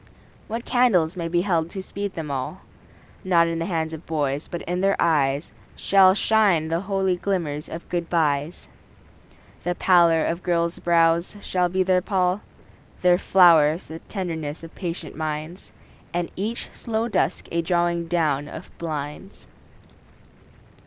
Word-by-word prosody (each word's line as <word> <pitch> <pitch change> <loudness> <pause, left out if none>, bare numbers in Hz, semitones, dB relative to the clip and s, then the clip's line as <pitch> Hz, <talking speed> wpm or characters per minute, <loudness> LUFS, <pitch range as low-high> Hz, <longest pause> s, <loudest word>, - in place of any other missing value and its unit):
What 230 +2 -4
candles 195 -10 +3
may 170 -2 -3
be 175 +1 +1
held 170 -4 0
to 190 - -6
speed 200 0 -5
them 155 -3 -5
all? 130 -2 -4 0.6
Not 170 -3 +4
in 165 0 -2
the 165 - -2
hands 160 -3 -2
of 160 +1 -8
boys, 145 -2 -1
but 175 - -6
in 180 +1 -2
their 195 0 +3
eyes 145 -3 +1 0.2
Shall 190 -1 +5
shine 200 -8 +2
the 165 +1 0
holy 190 -1 0
glimmers 165 -6 -2
of 165 - -8
good 170 -1 -3
byes. 155 -1 0 1.0
The 175 0 -1
pallor 170 -4 +4
of 170 +2 -2
girls' 170 -1 0
brows 170 +2 +2
shall 180 -2 0
be 185 +1 +1
their 185 0 +2
pall; 185 0 0 0.6
Their 180 0 +5
flowers 170 -4 +5
the 160 +1 -7
tenderness 165 -6 -5
of 165 - -10
patient 175 -2 -5
minds, 155 +3 -5 0.4
And 175 -1 -2
each 215 +5 -4
slow 225 0 -2
dusk 240 - 0
a 170 - +1
drawing 170 0 0
down 150 -4 0
of 160 +4 -10
blinds. 155 +3 -6
170 Hz, 150 wpm, -23 LUFS, 160-185 Hz, 1.0 s, Shall